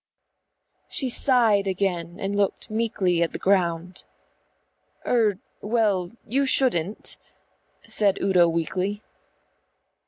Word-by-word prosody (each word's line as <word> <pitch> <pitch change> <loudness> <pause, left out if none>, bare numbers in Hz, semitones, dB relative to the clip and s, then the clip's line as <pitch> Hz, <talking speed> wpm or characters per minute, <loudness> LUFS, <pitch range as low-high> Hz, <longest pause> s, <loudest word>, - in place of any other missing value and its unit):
She 265 -4 -2
sighed 230 -6 +3
again 180 -3 -2
and 195 0 -3
looked 205 +1 -1
meekly 210 -6 0
at 170 - 0
the - - -3
ground. 180 -2 0 1.0
"Er, 220 -5 +2 0.2
well, 210 -5 0 0.2
you 275 +5 0
shouldn't," 215 -8 +1 0.7
said 200 -2 +1
Udo 180 -3 +3
weakly. 185 +5 -2
195 Hz, 95 wpm, -24 LUFS, 180-220 Hz, 1.0 s, sighed